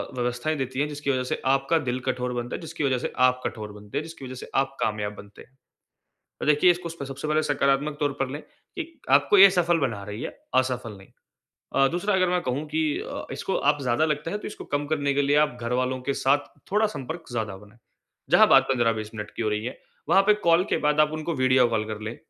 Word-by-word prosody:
व्यवस्थाएँ 125 +5 -1
देती 130 -1 -3
है 145 - +1
जिसकी 145 -1 -5
वजह 130 -1 0
से - - -3
आपका 135 +4 +2
दिल 125 +1 0
कठोर 125 -1 -1
बनता 120 0 -4
है - - -7
जिसकी 160 -2 -5
वजह 135 -2 +2
से - - -3
आप 125 0 +3
कठोर 105 -2 -4
बनते 105 +5 -7
हैं, 145 - -1
जिसकी 160 -4 -10
वजह 130 0 -7
से 125 - -9
आप 135 0 +1
कामयाब 105 -1 -1
बनते 100 0 -13
हैं। 135 - -19 0.9
देखिए 150 +4 +5
इसको 175 -1 -4
स 165 -3 -7
सबसे 135 +2 -6
पहले 155 +1 +2
सकारात्मक 145 0 +1
तौर 145 -2 +1
पर 135 -1 0
लें। 145 +2 -5 0.4
एक 330 -1 -6 0.2
आपको 145 +8 +5
ये 195 +1 +10
सफल 175 -2 +2
बना 115 -9 -2
रही 105 +2 -6
है, - - -3 0.3
असफल 125 -3 0
नहीं। 95 - -16 0.7
अ, 135 - +5
दूसरा 180 +6 -1
अगर 185 -1 +3
मैं 180 0 +1
कहूँ 135 +1 -2
कि 155 +1 -1 0.2
अ, - - -6
इसको 190 - -2 0.2
आप 145 - -9
ज़्यादा 125 +4 +2
लगता 150 +1 -2
है 205 - -2
तो - - -8
इसको - - -9
कम 145 0 -3
करने 145 -2 0
के 145 - +2
लिए 140 +1 +2
आप 125 - -11
घरवालों 125 +2 -1
के 140 - -1
साथ 145 +2 0
थोड़ा 215 +2 +4
संपर्क 160 +6 -6
ज़्यादा 110 -4 -3
बनाए। 105 +3 -18 0.5
जहाँ - - +7
बात - - +7
15-20 115 -4 0
मिनट 105 -1 -6
की - - -2
हो 110 - 0
रही 105 +1 -2
है, 125 - -6 0.3
वहाँ 195 - +6
पे 210 +1 +4
कॉल 170 +2 +5
के - - +3
बाद 150 0 +3
आप 150 0 +4
उनको 155 +2 -3
वीडियो 130 -2 +4
कॉल 110 -2 0
कर 105 - -6
लें 110 +2 -5
135 Hz, 235 wpm, -25 LUFS, 120-155 Hz, 0.9 s, ये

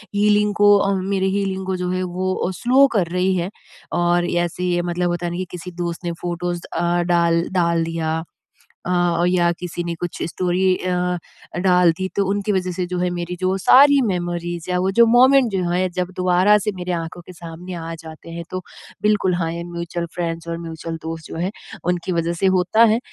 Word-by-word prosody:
Healing 210 0 +3
को 205 0 +6
अ, 200 0 +1
मेरे 190 0 0
healing 190 -1 -2
को 190 0 -1
जो 180 0 -3
है, 185 0 -1
वो 185 +1 -2
अ, - - -2
स्लो 260 +3 +5
कर 180 -4 +2
रही 185 +1 +2
है। 175 +1 -1 0.5
और 175 0 +2 0.2
ऐसे 175 +1 -5
ये 175 -1 +1
मतलब 175 0 0
होता 175 0 -2
है 170 - -2
ना 175 - -4
कि 185 - -2
किसी 180 +1 -7
दोस्त 170 0 -3
ने 170 - -1
फ़ोटोज़ 175 0 -3
अ, 175 +1 +1
डाल 170 0 +3
डाल 170 -3 +2
दिया। 160 -1 -2 0.6
अ, 175 -1 +1
या 175 -1 +3
किसी 175 -1 -4
ने 170 0 -3
कुछ 175 +1 -5
स्टोरी 180 +1 -1
अ, 180 -1 -1 0.5
डाल 180 -2 +5
दी 190 0 -2
तो 200 - +2
उनकी 205 +1 0
वज़ह 185 -2 -1
से 180 0 -2
जो 180 0 -3
है 180 0 0
मेरी 175 +1 -4
जो 185 +1 +1
सारी 280 +8 +6
मेमोरीज़ 175 -2 -3
या 180 - +1
वो 190 - +1
जो 235 - +9
मोमेंट 255 +1 +5
जो 190 - 0
है 185 +1 +1
जब 180 0 -1
दोबारा 185 +3 +4
से 210 +1 -2
मेरे 180 0 -3
आँखों 165 0 -4
के - - -10
सामने 175 +1 -9
आ 165 0 -5
जाते 160 0 -11
हैं 170 0 -6
तो 185 - -3 0.4
बिल्कुल 210 -3 +2
हाँ, 170 -2 -1
ये 170 0 -4
म्यूचुअल 170 0 -4
फ्रेंड्स 165 -1 -3
और 165 0 -3
म्यूचुअल 165 0 -6
दोस्त 160 -1 -6
जो - - -7
हैं 180 +4 -2 0.3
उनकी 180 +1 -1
वज़ह 170 0 0
से 195 - +3
होता 185 +6 +4
है। 225 0 +4
180 Hz, 210 wpm, -21 LUFS, 170-190 Hz, 0.6 s, जो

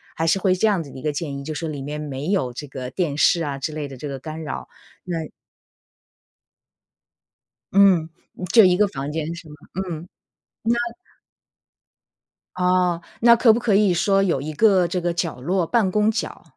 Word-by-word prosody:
还 165 - -1
是 180 +4 +2
会 185 -1 +2
这 205 - +1
样 195 -5 +2
子 145 - -9
的 - - -10
一 - - -8
个 150 - -1
建 145 -1 -4
议， 140 - -7
就 155 +2 -5
说 160 +2 -4
里 145 -3 -5
面 150 +2 -5
没 145 0 -5
有 130 -12 0
这 145 - -7
个 130 -2 -6
电 145 +1 -2
视 170 +2 +3
啊 140 -2 -3
之 150 +3 -4
类 150 -2 -4
的 135 - -9
这 145 - -6
个 135 -1 -5
干 155 +3 -7
扰， 150 - -6 0.4
那 165 -2 -3 2.4
嗯， 190 -5 +5 0.4
就 225 -3 +9
一 180 -1 +4
个 210 -1 +4
房 140 -4 -5
间 160 +1 -3
是 170 -2 -11
吗？ 150 - -11 0.2
嗯， 175 -3 -4 0.7
那 240 0 -2 1.6
哦， 180 -1 +1 0.2
那 235 0 +7
可 230 -1 +5
不 235 - 0
可 225 -4 +1
以 200 -3 +4
说 195 +3 +2
有 165 -8 0
一 155 +1 -5
个 190 0 +4
这 180 +1 -2
个 175 0 -1
角 170 -7 -3
落 175 +4 0
办 215 -6 +2
公 210 +1 +2
角， 220 - -3
170 Hz, 205 characters per minute, -22 LUFS, 150-190 Hz, 2.4 s, 就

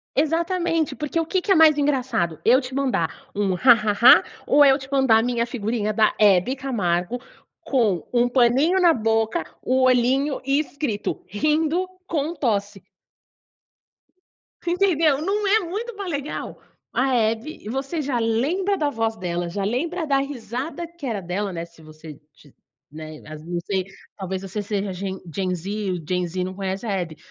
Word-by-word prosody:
Exatamente, 330 +2 0
porque 300 +2 -2
o 330 - 0
que 370 +3 0
que 395 - -1
é - - +6
mais 315 -2 +6
engraçado, 260 - 0
eu 250 +3 +5
te 255 -1 -7
mandar 255 -12 -2
um 200 -2 +1
"ha 245 +7 +6
ha 215 -2 0
ha" 235 +5 +7 0.2
ou 290 - +6
é 280 - +7
eu 270 - +3
te 265 0 -11
mandar 265 -5 +4
a - - 0
minha 240 -1 0
figurinha 220 -2 -2
da 215 0 +3
Hebe 205 +4 +4
Camargo, 225 -5 -1 0.4
com 215 - 0
um 245 0 +3
paninho 260 +9 +3
na 345 -2 +6
boca, 225 -5 0 0.2
o 260 +1 +1
olhinho 255 +3 +2
e 275 +2 +2
escrito 285 -8 -3
"rindo 305 - 0 0.2
com 315 -1 -1
tosse"? 205 - -2 1.8
Entendeu, 335 -5 +2
não 405 +5 -1
é 425 +3 +4
muito 420 +6 -5
mais 400 -2 -5
legal? 285 -2 -5 0.3
A 265 0 +1
Hebe 225 +2 -1
você 275 +6 -3
já 270 -3 -1
lembra 285 - 0
da 300 -4 0
voz 225 -4 -1
dela, 175 -2 -3
já 195 +3 -3
lembra 320 - -2
da 275 -1 +3
risada 275 +4 -4
que 340 -3 -11
era 220 -6 -2
dela, 190 +2 -3
né, 165 -1 -4
se 170 -1 -20
você 155 -1 -12
tiv 145 - -21 0.4
né, 155 +1 -9
as 155 0 -9
não 175 +1 -3
sei, 190 -2 -1 0.3
talvez 190 -1 -4
você 195 +2 -4
seja 200 -1 -3
ge 190 +1 -4 0.2
gen 185 -2 -1
Z, 180 +2 -6 0.2
o 175 -4 -5
gen 180 0 0
Z 180 +2 -4
não 185 - -5
conhece 195 +2 -4
a 220 - -2
Hebe. 175 -5 -3
245 Hz, 175 wpm, -23 LUFS, 195-295 Hz, 1.8 s, ha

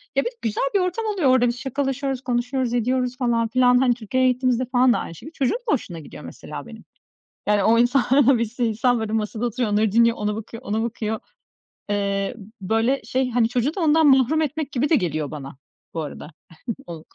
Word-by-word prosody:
Ya, - - +3
bir - - -13
de - - -21
güzel 220 -2 -1
bir - - +5
ortam 365 +5 -1
oluyor 390 -10 +1
orada. 255 -1 +4
Biz 240 +1 -2
şakalaşıyoruz, 270 0 -2
konuşuyoruz, 250 0 -1
ediyoruz 250 +1 0
falan 235 -3 +1
filan. 250 +1 +4
Hani, 250 -1 +3
Türkiye'ye 255 +3 +1
gittiğimizde 255 0 0
falan 250 0 +4
da - - 0
aynı 165 - -7
şekilde. 310 - -11
Çocuğun 275 - 0
da - - +3
hoşuna 175 - -3
gidiyor 150 - -11
mesela - - -8
benim. - - -12 0.6
Yani 205 -1 +3
o 230 +3 +4
insanlara 260 +1 +4
bir 230 - +1
sürü 240 +2 -2
insan, 235 +2 +1
böyle, 220 -1 -3
masada 220 +1 -2
oturuyor, 240 -1 -1
onları 210 0 +2
dinliyor, 230 +2 +4
ona 210 0 -1
bakıyor, 225 +2 -8
ona 220 -2 -1
bakıyor. 220 -2 -3 0.7
Iıı, 200 +1 -1 0.3
böyle, 225 +7 +1
şey, 255 +3 -1
hani, 235 -1 +2
çocuğu 250 +5 0
da 390 - -4
ondan 320 -1 +4
mahrum 270 +3 +4
etmek 300 -1 -3
gibi 275 +2 0
de - - +5
geliyor 155 - -2
bana, 140 -3 -8 0.4
bu 165 - -2
arada. 150 0 -8 0.6
Onu 165 -2 -8
245 Hz, 205 wpm, -23 LUFS, 220-265 Hz, 0.7 s, bir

